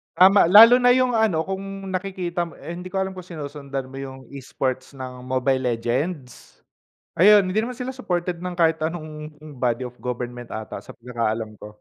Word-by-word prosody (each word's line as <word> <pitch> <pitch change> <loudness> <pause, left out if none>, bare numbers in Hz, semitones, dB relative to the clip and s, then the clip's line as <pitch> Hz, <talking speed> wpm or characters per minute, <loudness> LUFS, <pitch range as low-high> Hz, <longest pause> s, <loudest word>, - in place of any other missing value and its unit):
Tama 190 -1 +6
lalo 230 +6 +9
na 245 0 +5
yung 255 -1 +2
ano 185 -8 +2
kung 195 +1 -6
nakikita 180 -2 -3
mo - - -14
eh, 170 - -9
hindi 180 +1 -7
ko 190 +1 -2
alam 190 0 -2
kung 185 -2 -10
sinusundan 140 -4 -6
mo 135 - -9
yung 135 -1 -7
e-sports 130 -1 -4
ng 125 -1 -8
Mobile 130 +1 +1
Legends? 125 +4 -4 0.5
Ayun 200 +1 +6
hindi 195 +4 0
naman 250 +1 -5
sila 255 +1 -4
supported 175 -7 -2
ng 180 -1 -4
kahit 165 -1 +3
anong 155 -2 -5 0.3
body 125 0 0
of 125 - -14
government 120 -1 -5
ata 110 0 -6
sa - - -11
pagkakaalam 115 -2 -3
ko. 105 - -9
160 Hz, 180 wpm, -23 LUFS, 130-190 Hz, 0.5 s, lalo